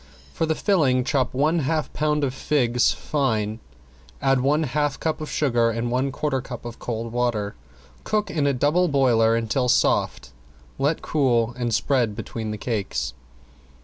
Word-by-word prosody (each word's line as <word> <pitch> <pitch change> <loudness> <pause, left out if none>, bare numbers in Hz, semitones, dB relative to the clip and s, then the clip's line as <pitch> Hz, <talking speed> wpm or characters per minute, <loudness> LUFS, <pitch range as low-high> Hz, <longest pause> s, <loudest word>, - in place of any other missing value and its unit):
For 160 - -1
the 160 - +1
filling 145 -10 +2
chop 130 -1 0
one 155 +6 +1
half 155 +1 -1
pound 150 -1 0
of 130 -2 0
figs 125 -3 +2
fine, 110 -7 -1 0.6
add 135 -1 +2
one 150 +4 +2
half 145 0 -1
cup 160 0 -2
of 155 - -5
sugar 120 -5 +2
and 115 +1 -2
one 130 +2 0
quarter 135 -1 -1
cup 120 -2 -8
of 120 -1 -7
cold 115 -1 -4
water. 120 -4 -1 0.5
Cook 210 -1 -1
in 150 -2 +1
a - - +3
double 150 +8 +2
boiler 120 -6 +3
until 115 +3 0
soft, 65 - +1 0.5
let 145 +4 0
cool, 120 -6 +1
and 120 -1 -2
spread 115 -1 +1
between 110 0 -5
the 105 - -4
cakes. 105 - -3
130 Hz, 160 wpm, -23 LUFS, 115-150 Hz, 0.6 s, a